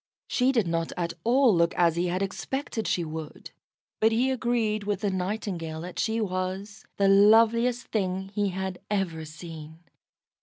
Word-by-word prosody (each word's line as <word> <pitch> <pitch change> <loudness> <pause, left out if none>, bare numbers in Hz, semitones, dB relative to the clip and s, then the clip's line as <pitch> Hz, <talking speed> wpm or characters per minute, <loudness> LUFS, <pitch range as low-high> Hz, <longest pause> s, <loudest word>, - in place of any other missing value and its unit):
She 255 +1 +2
did 230 -6 +2
not 165 0 -1
at 170 -1 -2
all 245 -2 +4
look 170 0 +2
as 170 -2 +3
he 175 +1 0
had 180 +2 -1
expected 225 +3 -3
she 175 - 0
would, 155 -1 -7 0.5
but 220 +1 +4
he 250 +4 +2
agreed 230 -4 0
with 205 -1 -2
the 205 -2 0
Nightingale 180 -4 -3
that 180 +1 -7
she 225 +1 0
was 190 +1 -3
the 200 - +3
loveliest 225 +4 +5
thing 190 -2 -2
he 205 0 0
had 190 0 -4
ever 180 -6 -1
seen. 160 0 -10
195 Hz, 160 wpm, -27 LUFS, 175-220 Hz, 0.5 s, loveliest